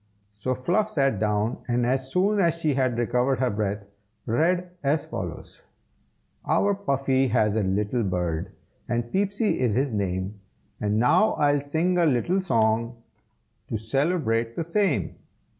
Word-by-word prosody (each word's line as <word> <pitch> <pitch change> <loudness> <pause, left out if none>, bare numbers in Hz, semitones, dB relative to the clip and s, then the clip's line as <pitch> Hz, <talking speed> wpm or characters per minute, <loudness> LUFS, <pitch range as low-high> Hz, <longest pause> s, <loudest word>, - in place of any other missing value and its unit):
So 105 +5 -3
Fluff 185 +12 0
sat 135 - +1
down, 105 +2 0
and 120 -1 +1
as 130 +1 -1
soon 200 +3 +2
as 170 -3 +3
she 160 -3 0
had 130 -3 0
recovered 125 +3 +1
her 125 -1 +1
breath, 100 0 -2 0.4
read 175 +9 +1
as 145 +2 0
follows: - - -7 0.8
Our 200 0 +2
Puffy 135 -8 +1
has 110 -3 +2
a 110 - +2
little 105 +5 0
bird, 90 -2 -2 0.4
And 120 0 -2
Peepsy 205 +3 0
is 120 -5 +1
his 135 -1 0
name, 95 0 -2 0.4
And 105 0 0
now 165 - +4
I'll 145 -1 +2
sing 165 +5 0
a 170 - +4
little 155 +8 +1
song, 115 -7 +1 0.7
To 110 - -2
celebrate 115 - 0
the 165 - -2
same. 180 -1 0
130 Hz, 145 wpm, -25 LUFS, 110-165 Hz, 0.8 s, now